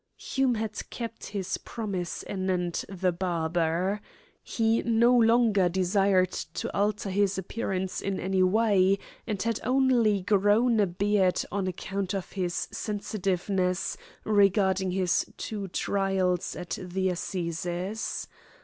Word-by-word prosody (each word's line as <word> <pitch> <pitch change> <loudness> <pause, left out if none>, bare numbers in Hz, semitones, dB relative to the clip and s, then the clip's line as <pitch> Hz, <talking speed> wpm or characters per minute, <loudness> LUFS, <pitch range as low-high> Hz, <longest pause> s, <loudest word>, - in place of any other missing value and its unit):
Hume 265 -3 0
had 220 -1 -4
kept 230 -1 -6
his 195 -3 -3
promise 200 -6 -4
anent 185 -3 -1
the 185 -1 0
barber. 175 +2 0 0.4
He 225 0 +1
no 235 +1 +4
longer 225 -5 +4
desired 185 +1 +2 0.2
to - - -3
alter 205 0 0
his 200 0 +1
appearance 190 -1 -3
in 195 -1 -2
any 190 +1 0
way, 195 -1 +4 0.3
and 210 -4 -2
had 230 -1 0
only 245 -6 +3
grown 210 +4 +3
a 205 - +4
beard 190 0 +1
on 195 -1 -1
account 195 +2 -3
of 190 - -4
his 180 -3 -2
sensitiveness 195 -3 -1 0.3
regarding 195 -2 +3
his 180 -1 0
two 205 -3 -4
trials 190 -1 0
at 175 0 -5
the 185 +1 -1
Assizes. 180 +3 -3
195 Hz, 120 wpm, -28 LUFS, 185-210 Hz, 0.4 s, no